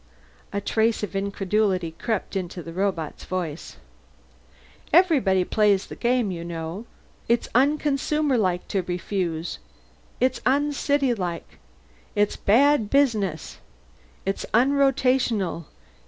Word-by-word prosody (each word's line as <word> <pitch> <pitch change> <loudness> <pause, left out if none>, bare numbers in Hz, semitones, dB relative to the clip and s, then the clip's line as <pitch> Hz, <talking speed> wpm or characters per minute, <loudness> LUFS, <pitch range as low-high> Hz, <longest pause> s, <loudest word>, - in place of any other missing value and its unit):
A 200 - -1
trace 220 +1 0
of 205 - -4
incredulity 195 -2 0
crept 210 +4 -3
into 180 -2 -4
the 165 - -8
robot's 185 -4 -2
voice. 175 -4 -5 1.1
"Everyone 260 - +4
plays 205 -2 +2
the - - -9
game, 240 -4 +1
you 170 -2 -5
know. 170 +5 -6 0.4
It's 235 0 +2
unconsumerlike 275 -7 +1
to 195 - 0
refuse. 175 - -3 0.6
It's 255 +1 +1
uncitylike. 270 - 0 0.6
It's 205 0 +2
bad 245 +1 +3
business. 215 - 0 0.7
It's 195 - -2
unrotational. 250 - +2
205 Hz, 95 wpm, -24 LUFS, 180-255 Hz, 1.1 s, Everyone